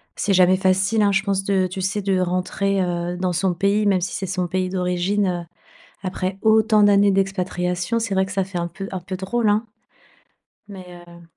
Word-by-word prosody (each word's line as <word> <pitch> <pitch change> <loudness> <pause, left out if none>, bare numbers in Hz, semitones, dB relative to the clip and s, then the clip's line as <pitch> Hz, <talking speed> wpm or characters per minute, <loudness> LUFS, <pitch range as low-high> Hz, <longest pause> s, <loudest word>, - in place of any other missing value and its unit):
C'est 200 - 0
jamais 185 0 +5
facile 190 +3 +2
hein, 205 -1 +3
je 195 0 +1
pense 195 -1 -1
de 195 -1 +1
tu 185 +1 -5
sais, 195 +2 -2
de 190 -1 +1
rentrer, 185 +2 -1
heu, 175 0 -3
dans 180 0 -1
son 180 +1 0
pays, 200 +3 +1
même 190 -2 +2
si 180 - -3
c'est 190 - -4
son 180 0 -2
pays 185 +1 -1
d'origine, 180 +2 0
heu, 175 -1 -2 0.6
après 185 0 -3
autant 220 0 +4
d'années 205 0 +5
d'expatriation, 185 +1 -1
c'est 225 -3 -2
vrai 190 0 +2
que 190 - -8
ça 195 0 0
fait 190 -1 -9
un 170 0 -2
peu 195 +3 -8
un 185 - -3
peu 185 +1 -6
drôle 210 +4 0
hein? 215 +3 +1 1.0
Mais 195 -3 -9 0.2
heu 170 0 -14
190 Hz, 205 wpm, -21 LUFS, 180-200 Hz, 1.0 s, jamais